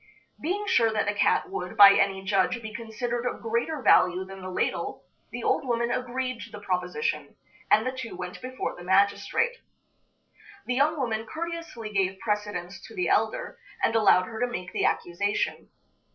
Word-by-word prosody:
Being 390 +6 -1
sure 230 - +3
that 220 - 0
the 205 - 0
cat 205 - +2
would, 405 - -5
by 200 -1 +10
any 195 -1 +1
judge, 195 +4 +1
be 220 -2 -8
considered 235 +2 -3
of - - -3
greater 235 +6 -1
value 180 +1 +4
than 195 0 -10
the 185 - -6
ladle, 180 - -2 0.3
the - - -6
old - - +1
woman 235 -2 0
agreed 255 -1 -2
to 220 - -8
the 210 -1 -9
proposition, 180 -6 -2 0.3
and 215 - +4
the 255 - 0
two 260 -5 -7
went 180 +1 -7
before 255 0 -4
the 175 - -10
magistrate. 200 - +2 1.1
The 250 - -1
young 290 +5 +2
woman 225 -4 -2
courteously 330 -10 -6
gave 190 -1 +1
precedence 205 -4 -3
to - - -13
the 365 - 0
elder, - - 0 0.2
and 225 - +2
allowed 200 -4 +5
her 220 +3 -7
to 245 - +1
make 180 -4 -5
the - - +1
accusation. 200 +4 -1
220 Hz, 175 wpm, -27 LUFS, 195-250 Hz, 1.1 s, by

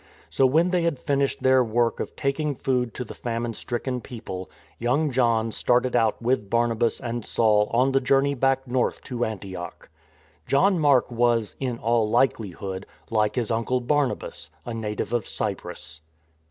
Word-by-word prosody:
So, 135 - +4
when 165 +7 +3
they 180 -1 +2
had 165 -4 0
finished 140 0 -1
their 130 0 +5
work 115 0 +1
of - - -5
taking 140 +1 -1
food 125 -3 0
to 125 - -3
the - - -9
famine 115 -1 -3
stricken 125 +2 -3
people, 110 -8 -7 0.3
young 140 +6 +1
John 115 -3 +2
started 125 +3 +1
out 115 -3 +2
with 115 -4 0
Barnabas 115 0 +1
and 120 -1 -4
Saul 105 -2 +2
on 125 +3 +3
the 135 0 +2
journey 135 +2 +3
back 135 0 +1
north 125 0 0
to 120 -3 -3
Antioch. 95 -5 -6 0.6
John 185 +6 +3
Mark 140 -5 +3
was, 120 -2 +1
in 125 -3 -2
all 115 -2 +1
likelihood, 100 -6 0 0.2
like 105 -2 +1
his 120 -2 -1
uncle 115 +3 0
Barnabas, 125 - -1 0.2
a 120 - -4
native 110 0 -3
of 120 -5 0
Cyprus. 90 -6 -5
120 Hz, 160 wpm, -25 LUFS, 110-130 Hz, 0.6 s, their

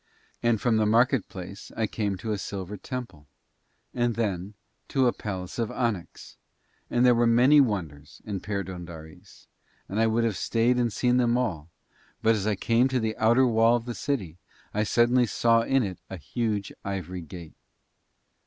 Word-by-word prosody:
And 120 -2 +2
from 115 +1 +2
the 110 -1 +2
market 120 +1 +3
place 95 +2 -9
I 110 - +1
came 105 -3 -2
to 110 +5 -4
a 105 - -1
silver 100 0 -5
temple 100 - -7 0.7
and 120 -2 0
then 100 -3 -2 0.3
to 135 -2 +2
a 120 - +3
palace 95 0 -6
of 115 -2 0
onyx, 115 -8 -4 0.5
and 120 +1 +2
there 125 - +6
were 120 0 +3
many 130 +6 +6
wonders 80 - -3
in 100 -3 -3
Perdóndaris, 90 -2 -7 0.4
and 100 - -3
I 115 - +4
would 115 +1 +1
have 115 -4 0
stayed 120 +2 +1
and 120 -2 +1
seen 125 +4 +2
them 120 -1 +3
all, 85 -11 -2 0.5
but 115 0 +5
as 105 -1 -2
I 105 - +1
came 115 +5 +2
to 130 -1 0
the 110 -1 -2
outer 120 +4 +4
wall 115 0 +4
of 120 -1 -3
the 120 - -4
city 100 - -3 0.3
I 105 +1 +1
suddenly 120 +2 +3
saw 115 +1 +3
in 135 +2 +2
it 95 -4 -5
a 95 - -6
huge 105 - -3
ivory 90 -2 -4
gate. 85 0 -10
110 Hz, 175 wpm, -26 LUFS, 95-120 Hz, 0.7 s, there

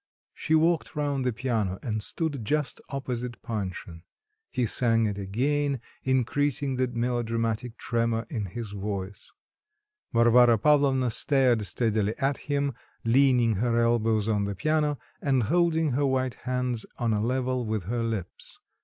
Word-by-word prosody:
She 160 - 0
walked 165 +1 +2
round 145 -3 -1
the 125 - +1
piano 110 -5 -1
and 110 -3 -2
stood 145 +1 -3
just 150 +5 -1
opposite 125 -3 -4
Panshin. 95 -7 -5 0.5
He 125 - 0
sang 115 0 +2
it 100 -1 -2
again, 135 +8 0 0.2
increasing 130 +1 0
the 130 0 +2
melodramatic 115 -1 -2
tremor 115 -1 -1
in 110 -4 -3
his 105 +3 -6
voice. 100 -1 -5 0.8
Varvara 120 0 +5
Pavlovna 135 -1 +3
stared 125 -4 +2
steadily 110 0 0
at 135 -1 0
him, 140 -1 0 0.3
leaning 120 -3 +4
her 115 +2 +1
elbows 115 -2 +2
on 105 -2 +1
the 100 0 -3
piano 150 +5 +1 0.2
and 135 -4 +2
holding 165 +2 +2
her 140 +3 +1
white 130 -1 0 0.2
hands 125 -2 -1
on 115 -2 0
a 105 - 0
level 130 +2 0
with 110 -3 -2
her 115 +6 -2
lips. 110 -6 -5
120 Hz, 140 wpm, -27 LUFS, 110-135 Hz, 0.8 s, Varvara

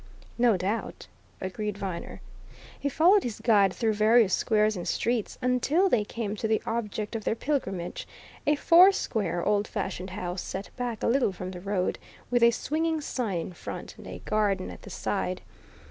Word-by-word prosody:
"No 235 -5 +4
doubt," 200 +5 -3 0.3
agreed 205 +2 -4
Viner. 190 -4 -5 0.6
He 285 - -1
followed 360 +8 +5
his 235 -4 -4
guide 205 -5 +4
through 220 +2 0
various 215 -1 +4
squares 215 -1 +2
and 175 - -5
streets 235 -2 -1
until 275 +9 +2
they 225 -10 +3
came 210 0 -4
to 220 - -1
the 220 0 +2
object 220 -1 -3
of 220 - -3
their 220 - 0
pilgrimage 195 - -3 0.4
a 295 - +5
four 345 +6 +7
square, 210 - -2
old 205 0 +2
fashioned 190 -2 -4
house 180 0 -4
set 195 +1 -6
back 245 -3 -4
a - - +2
little 245 -2 +3
from 185 0 -6
the 180 -1 -8
road, 195 -1 -1 0.3
with 245 -1 +3
a 235 - +8
swinging 320 +6 -1
sign 245 - -2
in 180 - -7
front, - - -7
and - - -10
a - - -8
garden 205 - 0
at 90 - -11
the - - -11
side. - - -2
215 Hz, 175 wpm, -27 LUFS, 195-245 Hz, 0.6 s, a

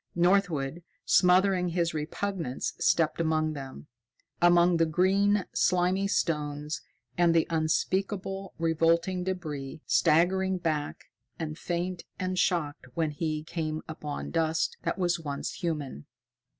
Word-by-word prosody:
Northwood, 175 -4 +2 0.2
smothering 180 0 +4
his 170 -1 0
repugnance, 160 -1 -3
stepped 165 0 +2
among 155 -1 +1
them 135 -1 -8 0.6
among 175 0 +5
the 165 0 +3
green, 195 +4 +2
slimy 185 +2 +2
stones 150 -4 -1 0.4
and 170 -1 +4
the 165 - +4
unspeakable 190 +4 -1
revolting 165 +2 +1
débris, 155 -6 -4
staggering 190 +4 +3
back 155 -4 -3 0.3
and 155 -2 -4
faint 175 +1 -3
and 185 0 -2
shocked 150 -7 0
when 160 -2 0
he 155 0 -3
came 155 -1 -4
upon 150 -2 -6
dust 160 -1 0
that - - -2
was 175 -2 +1
once 145 -3 -4
human. 150 - -4
170 Hz, 115 wpm, -28 LUFS, 155-185 Hz, 0.6 s, among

